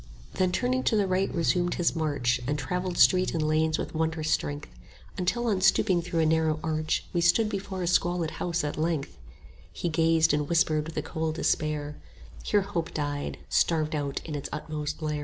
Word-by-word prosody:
Then 185 -1 +1
turning 255 +6 0
to 225 - +3
the 205 -2 +3
right 190 +1 0
resumed 175 +1 +1
his 175 0 +1
march, 135 -6 0
And 145 +1 0
travelled 180 +5 -3
street 185 -2 +4
and 155 -2 0
lanes 155 0 +2
with - - -5
wondrous 160 -1 -1
strength, 145 +1 -1
20 - - -21 0.4
Until 240 +7 0
on 205 -5 +1
stooping 185 -1 +3
through 170 -1 -1
a - - +3
narrow 160 -1 +2
arch 155 -1 -1
We 175 - +1
stood 175 +6 +4
before 195 -3 -4
a - - -1
squalid 175 -2 +1
house 170 -1 -1
at 150 0 -3
length: 160 -3 -1 0.6
He 175 - -3
gazed, 160 -1 +3
and 150 -1 0
whispered 155 -2 +2
with 160 - -8
a 155 - -1
cold 160 0 -3
despair, 150 -2 -1 0.4
Here 205 - +2
Hope 170 -4 -4
died, 145 -1 -3
starved 160 -2 +1
out 145 -2 -3
in 155 - -6
its 145 -2 -4
utmost 155 0 -4
lair. 150 -1 -1
160 Hz, 195 wpm, -27 LUFS, 155-180 Hz, 0.6 s, street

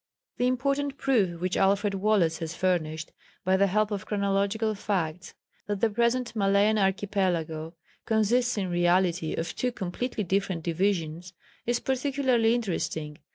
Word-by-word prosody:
The 245 - +2
important 275 +2 0
proof 205 -11 +1
which 185 +1 -1
Alfred 200 +1 +2
Wallace 190 -5 +2
has 165 0 -5
furnished, 160 -4 -1 0.3
by 185 +1 +3
the 200 +1 +4
help 215 +2 +1
of 200 -2 -4
chorological 200 +2 0
facts, 180 -4 -3 0.3
that 205 -1 -2
the 225 +1 +2
present 235 +2 0
Malayan 200 +1 +3
Archipelago 185 -5 -1 0.3
consists 235 +3 +2
in 190 -3 -1
reality 175 -1 +2
of 165 +1 -4
two 250 - -1
completely 215 +3 -3
different 190 -2 -1
divisions, 175 -1 -1 0.3
is 240 0 +1
particularly 260 -3 +1
interesting. 165 -8 -3
200 Hz, 135 wpm, -27 LUFS, 175-225 Hz, 0.3 s, the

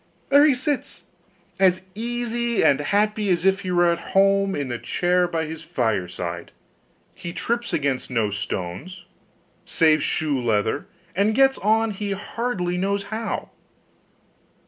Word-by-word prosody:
There 285 +2 +7
he 280 - +4
sits 270 +2 -3 0.6
as 185 -1 +4
easy 235 +1 -1
and 140 - +4
happy 210 +6 +1
as 175 -1 +1
if 195 0 +4
he 190 -2 -5
was 175 -1 +3
at - - -12
home, 195 0 +3
in 140 -3 -3
the 120 -1 -3
chair 180 0 +1
by 165 -2 -2
his 160 0 -7
fireside; 95 - -2 0.6
he 170 - -7
trips 235 +4 -2
against 140 -3 -1
no 115 -5 0
stones, 105 - -5 0.6
saves 155 -2 +3
shoe 145 -3 0
leather, 115 - 0 0.3
and 205 +3 +2
gets 270 +1 +4
on 220 +2 +2
he 200 0 -3
hardly 195 -4 -3
knows 200 +1 0
how. 225 +1 -3
180 Hz, 140 wpm, -23 LUFS, 145-215 Hz, 0.6 s, There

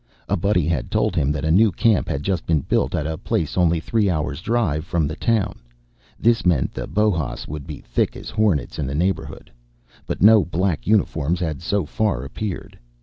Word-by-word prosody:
A - - +1
buddy 90 -2 +1
had 80 -5 -1
told - - 0
him 75 -4 +1
that 75 0 -2
a 80 - +2
new 105 +5 +5
camp 110 +3 +2
had 70 - -2
just 95 0 -2
been 80 -3 +2
built - - 0
at 75 - -1
a 80 0 -3
place 80 -3 -2
only 85 -2 +3
three 105 +3 +1
hours 75 -3 -2
drive 110 -9 0
away - - -3
from 85 -4 +1
the 80 - -4
town. 105 - 0 0.6
This 115 +1 +3
meant 85 -8 +1
that - - -7
Bohas 100 -10 0
would 75 0 -7
be 75 -3 -7
thick - - -1
as - - -8
hornets 105 - 0
in 70 - -1
the 70 - -3
neighborhood. 90 +5 -2 0.6
But - - -2
no 110 -1 +7
black 85 -1 -1
uniforms 90 -6 +1
had 80 -5 -3
so 100 +3 0
far 105 - -1
appeared. 95 +7 -6
85 Hz, 205 wpm, -22 LUFS, 75-105 Hz, 0.6 s, no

